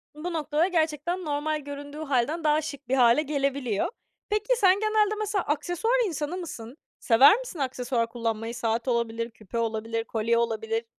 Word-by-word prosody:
bu 340 +3 -5
noktada 310 +2 +1
gerçekten 335 +1 -1
normal 300 +1 -1
göründüğü 285 +1 -8
hâlden 290 +4 0
daha 300 0 +3
şık 285 -4 -7
bir 265 - +1
hâle 245 +2 +5
gelebiliyor. 275 -7 -1 0.4
Peki, 425 +4 +1
sen 390 -2 +4
genelde 430 -1 +2
mesela 415 -3 -1
aksesuar 355 +11 0
insanı 310 +1 -3
mısın? 265 -7 -8 0.2
Sever 270 - +6
misin - - -8
aksesuar 250 -3 -1
kullanmayı? 230 0 -3
Saat 230 +2 -1
olabilir, 230 -1 -1
küpe 220 +1 -8
olabilir, 225 0 -2
kolye 230 +1 0
olabilir. 225 0 -1
285 Hz, 155 wpm, -26 LUFS, 235-335 Hz, 0.4 s, Sever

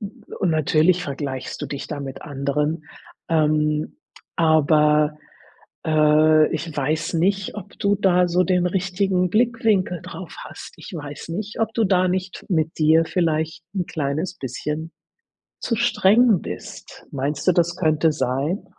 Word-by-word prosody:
und 210 -3 -5
natürlich 160 +3 +2
vergleichst 140 -3 -5
du - - -3
dich 140 0 -6
da 150 -2 -5
mit 135 -2 -7
anderen, 150 +2 -2 0.4
ähm, 155 -1 +1 0.4
aber 150 -1 +3 0.7
äh, 155 0 +4
ich 160 -1 -4
weiß 155 +3 -1
nicht, 195 +4 0
ob 205 -1 -10
du 200 0 +2
da 180 -3 +3
so 175 +1 +2
den 180 0 +2
richtigen 185 0 0
Blickwinkel 220 -6 +1
drauf - - -9
hast. - - -10
Ich - - -11
weiß 145 -1 -7
nicht, 205 +6 -5
ob 225 0 0
du 225 - +2
da 185 -1 +3
nicht 185 +1 -3
mit 160 -3 0
dir 160 +1 +4
vielleicht 160 -2 -1
'n 185 -4 -2
kleines 150 +3 -2
bisschen 150 +5 -5 0.7
zu 230 - -1
streng 225 -2 +4
bist. - - -9
Meinst 140 +4 -3
du, - - +7
das 175 0 +1
könnte 155 -2 +2
sein? 145 +7 -2
165 Hz, 140 wpm, -22 LUFS, 150-185 Hz, 0.7 s, du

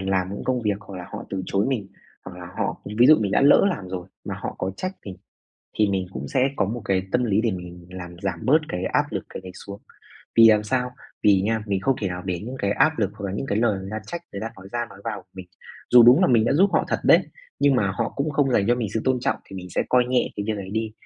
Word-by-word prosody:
làm 95 0 -1
những - - -7
công 125 -2 0
việc 105 -2 0
hoặc 100 -3 -10
là 90 - -7
họ - - -6
từ 95 -1 -3
chối 100 +2 +1
mình, 120 -7 -2 0.4
hoặc - - -9
là - - -8
họ - - -2 0.2
ví 125 - +7
dụ 155 - +8
mình 100 -2 -1
đã - - +3
lỡ 140 +1 +6
làm 100 - -5
rồi 90 -1 -5 0.2
mà - - -4
họ - - -4
có 95 - -2
trách 185 +1 -3
mình, 95 - -7 0.6
thì 105 -1 +4
mình 95 -2 -1
cũng - - -6
sẽ 135 0 +2
có - - +2
một 115 +3 -4
cái 95 -1 +1
tâm 125 0 +2
lý 105 -2 +2
để 115 0 +1
mình 90 -2 -8
làm 90 -1 -8
giảm 95 -4 -2
bớt 150 +5 +6
cái 90 +1 -3
áp - - +1
lực - - -4
cái - - -8
này 95 -1 -9
xuống. 100 0 -8 0.6
Vì 115 -1 +9
làm 105 -1 +5
sao? 125 +3 -1 0.3
Vì 100 -2 +5
nha, 110 +1 0
mình 100 -2 -1
không 135 +6 +2
thể 100 - -1
nào 90 0 -5
để 90 -2 -2
những 130 +2 -6
cái 100 - 0
áp 160 +4 +2
lực 100 -3 +1
hoặc 105 -2 -8
là 95 - -4
những 135 +7 -3
cái 105 - 0
lời 110 -4 +2
người 95 +1 -7
ta 110 - -3
trách, 170 -1 -5
người 100 - -5
ta 115 - -4
nói 95 +1 -12
ra 120 -1 -2
nói 95 - -13
vào 105 -4 -4
mình. 95 -1 -9 0.4
Dù 120 -1 +9
đúng 120 +3 +7
là - - +5
mình 115 -3 +4
đã 120 - +2
giúp 190 +7 +4
họ - - +2
thật - - 0
đấy, - - +7 0.4
nhưng 140 -1 +4
mà 100 -6 +2
họ 95 - -2
cũng 140 +2 -1
không 140 -2 +1
dành 100 -4 +2
cho 120 - +5
mình 120 -3 -2
sự 110 - +1
tôn 130 -1 +1
trọng, - - 0
thì 95 - -10
mình 90 - -7
sẽ - - 0
coi 125 -1 +4
nhẹ 125 -1 +2
cái 100 - -3
việc 110 -1 -1
ấy 95 -1 -7
đi. 110 0 -2
105 Hz, 295 wpm, -24 LUFS, 95-125 Hz, 0.6 s, Vì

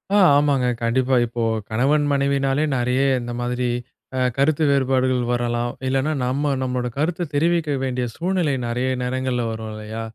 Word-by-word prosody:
ஆ. - - +5 0.2
ஆமாங்க 140 -4 +2 0.2
கண்டிப்பா. 130 +3 +2
இப்போ 120 0 -5 0.3
கணவன் 140 +7 +2
மனைவினாலே, 140 0 +1
நிறைய 125 +2 +1 0.2
இந்த 120 0 -5
மாதிரி 125 0 -1 0.5
ஆ - - +1 0.2
கருத்து 150 +3 +2
வேறுபாடுகள் 130 -2 +2
வரலாம். 120 0 -1 0.2
இல்லைனா 135 +3 +1
நம்ம 140 +3 0
நம்மளோட 125 -1 -1
கருத்து 165 +5 -1
தெரிவிக்க 165 +1 +1
வேண்டிய 125 -1 -1
சூழ்நிலை 175 -2 0
நிறைய 125 +2 -1
நேரங்கள்ல 130 0 -1
வரும் 110 0 -5
இல்லையா? 110 +1 -6
130 Hz, 140 wpm, -22 LUFS, 125-145 Hz, 0.5 s, ஆ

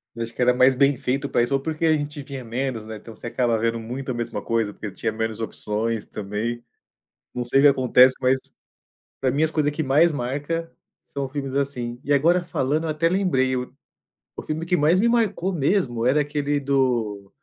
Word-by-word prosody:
Eu 115 - -3
acho 115 0 -7
que - - -5
era 125 0 +5
mais 130 +1 +4
bem 140 0 +3
feito 135 +2 -2
pra 120 - +2
isso 120 - -2
ou 135 - +3
porque 160 +3 -2
a 160 - +4
gente 145 -1 -4
via 135 -2 -7
menos, 120 -1 -3
né. 110 0 -7
Então 110 +1 -12
você 115 - -8
acaba 120 -1 +1
vendo 115 +1 0
muito 125 +4 -6
a - - -1
mesma 115 -3 -4
coisa, 115 -2 -1
porque 105 - -7
tinha 105 +3 -2
menos 110 0 -3
opções 110 0 -3
também. 110 +4 -4 0.7
Não 125 0 -3
sei 135 +3 +3
se 145 - +8
acontece, 130 -1 +5
mas 130 +1 +3 0.8
pra 130 - +2
mim 145 +4 +1
as 160 - +1
coisa 150 -2 +1
que 155 +2 -2
mais 155 +5 +4
marca 145 +6 -3 0.4
são 140 -1 -4
filmes 135 -1 -4
assim. 125 -4 -2
E 145 - -3
agora 170 +6 +3
falando, 155 -1 -1
eu - - -2
até 155 +2 +1
lembrei 150 -9 +1
o 125 0 -4 0.6
o - - -6
filme 155 +1 -4
que 180 +1 +1
mais 165 +6 +3
me 235 - +3
marcou 205 -5 +1
mesmo, 140 - 0
era 140 +4 +4
aquele 145 0 -1
do 120 -8 0
135 Hz, 210 wpm, -23 LUFS, 120-150 Hz, 0.8 s, se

